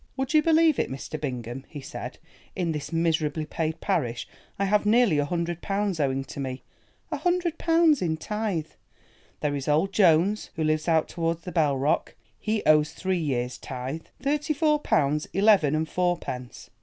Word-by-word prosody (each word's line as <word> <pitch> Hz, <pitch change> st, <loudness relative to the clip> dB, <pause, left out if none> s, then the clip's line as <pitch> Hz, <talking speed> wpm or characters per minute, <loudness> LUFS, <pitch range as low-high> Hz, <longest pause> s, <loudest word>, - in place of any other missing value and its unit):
"Would 265 Hz, +2 st, -2 dB
you 310 Hz, -, +6 dB
believe 320 Hz, -1 st, +4 dB
it, -, -, 0 dB
Mr. 140 Hz, +3 st, -6 dB
Bingham," 125 Hz, -2 st, -4 dB
he 150 Hz, -, -8 dB
said, 135 Hz, -, -7 dB, 0.4 s
"in 175 Hz, -3 st, -1 dB
this 150 Hz, -1 st, -5 dB
miserably 160 Hz, -2 st, 0 dB
paid 160 Hz, +1 st, -3 dB
parish 150 Hz, -, -1 dB, 0.3 s
I 200 Hz, -, +1 dB
have 205 Hz, +1 st, +2 dB
nearly 215 Hz, -7 st, +4 dB
a 145 Hz, -, +1 dB
hundred 170 Hz, +1 st, -2 dB
pounds 200 Hz, -3 st, -1 dB
owing 135 Hz, -2 st, 0 dB
to 135 Hz, -, -9 dB
me, 130 Hz, -1 st, -4 dB, 0.5 s
a -, -, -1 dB
hundred 355 Hz, -2 st, 0 dB
pounds 330 Hz, -3 st, +4 dB
in 160 Hz, -3 st, 0 dB
tithe. 205 Hz, -4 st, -3 dB, 0.7 s
There 145 Hz, -1 st, 0 dB
is 140 Hz, -1 st, -4 dB
old 155 Hz, +7 st, +2 dB
Jones 190 Hz, +2 st, +3 dB
who 160 Hz, -, -1 dB
lives 155 Hz, +1 st, 0 dB
out 160 Hz, -2 st, +3 dB
towards 165 Hz, -1 st, -2 dB
the 180 Hz, -, -6 dB
Bell 150 Hz, -6 st, +2 dB
Rock, 140 Hz, +3 st, 0 dB, 0.2 s
he 215 Hz, -1 st, -1 dB
owes 150 Hz, -1 st, +4 dB
three 185 Hz, -1 st, -1 dB
years' 125 Hz, -5 st, -2 dB
tithe—thirty 255 Hz, -, -3 dB
four 300 Hz, 0 st, +2 dB
pounds 150 Hz, -, +1 dB
eleven 195 Hz, -7 st, +4 dB
and 160 Hz, +1 st, 0 dB
fourpence. 170 Hz, -9 st, -3 dB
165 Hz, 170 wpm, -26 LUFS, 145-210 Hz, 0.7 s, you